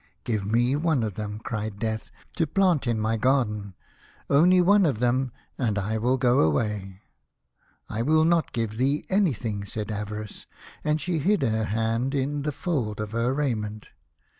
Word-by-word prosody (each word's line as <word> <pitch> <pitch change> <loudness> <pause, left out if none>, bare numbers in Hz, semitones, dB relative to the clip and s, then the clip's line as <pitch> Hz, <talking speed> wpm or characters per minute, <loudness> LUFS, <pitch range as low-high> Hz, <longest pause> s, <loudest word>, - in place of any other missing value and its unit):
" - - -43
Give 105 -4 -2
me 120 +4 +3
one 155 -5 +1
of 110 -2 -2
them," 105 +1 -5
cried 110 -2 -4
Death, 110 0 -3
" - - -14
to 165 - +2
plant 175 -5 +2
in 115 -2 +1
my 110 +1 0
garden; 105 -6 0 0.6
only 175 +6 +6
one 200 +3 +5
of 135 - 0
them, 125 +2 +1 0.3
and 110 -6 0
I 105 +3 -1
will 125 +4 +2
go 125 0 +3
away." 95 +5 0 0.4
" 60 -1 -50 0.3
I 110 - -3
will 155 +5 +3
not 170 -1 +2
give 115 -3 -3
thee 135 +4 +1
anything," 125 - 0
said 105 +1 -5
Ava 105 0 -4
rice, 105 - -10 0.4
and 150 0 +1
she 165 +2 -1
hid 185 +1 +2
her 110 -3 +1
hand 115 +5 -1
in 145 +2 -1
the 150 +1 -1
fold 130 - -2
of 105 -1 -4
her 115 +2 0
raiment. 110 -7 -2
115 Hz, 185 wpm, -26 LUFS, 105-145 Hz, 0.6 s, only